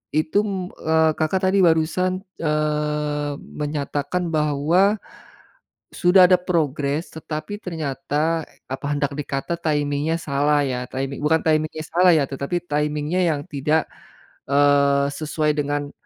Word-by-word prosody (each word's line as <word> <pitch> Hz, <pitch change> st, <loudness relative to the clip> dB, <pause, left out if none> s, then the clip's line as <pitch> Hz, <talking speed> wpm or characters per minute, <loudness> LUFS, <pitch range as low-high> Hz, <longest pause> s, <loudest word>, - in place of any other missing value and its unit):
itu, 185 Hz, +4 st, 0 dB
eee, 160 Hz, 0 st, +3 dB
Kakak 160 Hz, +4 st, +1 dB
tadi 200 Hz, -, +3 dB
barusan, 180 Hz, +3 st, +2 dB, 0.2 s
eee, 150 Hz, -1 st, -1 dB
menyatakan 150 Hz, +4 st, -3 dB
bahwa 155 Hz, +6 st, +2 dB, 1.0 s
sudah 180 Hz, 0 st, +5 dB
ada 185 Hz, -, +6 dB
progres 155 Hz, -3 st, -1 dB
tetapi 160 Hz, +5 st, -5 dB
ternyata, 160 Hz, 0 st, -2 dB, 0.2 s
apa 130 Hz, +2 st, -6 dB
hendak 145 Hz, 0 st, -1 dB
dikata 145 Hz, +3 st, -3 dB
timing-nya 150 Hz, -1 st, 0 dB
salah 145 Hz, 0 st, +1 dB
ya, 130 Hz, -3 st, -2 dB
timing 135 Hz, +2 st, -4 dB
bukan 160 Hz, +2 st, +3 dB
timing-nya 155 Hz, 0 st, 0 dB
salah 180 Hz, +1 st, +4 dB
ya, 155 Hz, -4 st, +4 dB
tetapi 140 Hz, +6 st, -3 dB
timing-nya 150 Hz, +3 st, 0 dB, 0.2 s
yang -, -, -5 dB
tidak, 150 Hz, +1 st, 0 dB, 0.6 s
eee, 140 Hz, 0 st, +4 dB
sesuai 155 Hz, 0 st, -1 dB
dengan 145 Hz, -1 st, -2 dB
150 Hz, 115 wpm, -22 LUFS, 145-165 Hz, 1.0 s, ada